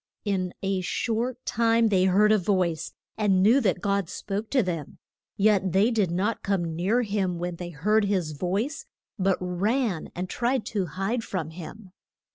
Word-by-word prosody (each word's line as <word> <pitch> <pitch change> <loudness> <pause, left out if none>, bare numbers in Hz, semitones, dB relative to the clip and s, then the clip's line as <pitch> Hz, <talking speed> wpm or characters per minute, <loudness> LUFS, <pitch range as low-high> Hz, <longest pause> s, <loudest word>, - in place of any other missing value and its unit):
In 185 -3 -1
a 195 -1 0
short 235 +6 -2
time 230 0 +3
they 185 -2 +3
heard 205 +3 +4
a 215 - +5
voice, 180 -4 0 0.3
and 195 -3 +3
knew 240 +7 +5
that 185 -5 +1
God 200 -3 0
spoke 205 +3 -4
to 260 -4 +3
them. 165 -5 -4 0.4
Yet 195 -3 +3
they 205 +5 +4
did 210 -6 +1
not 195 +6 -1
come 175 -5 -1
near 205 +9 +1
him 195 -5 -1
when 175 0 -4
they 175 0 -6
heard 205 +7 +1
his 185 -6 0
voice, 205 - -2 0.3
but 190 0 +2
ran 190 - -1
and 180 +1 -3
tried 245 +4 -1
to 195 -4 0
hide 195 +8 -2
from 165 -7 -4
him. 185 +4 -10
195 Hz, 170 wpm, -26 LUFS, 180-220 Hz, 0.4 s, a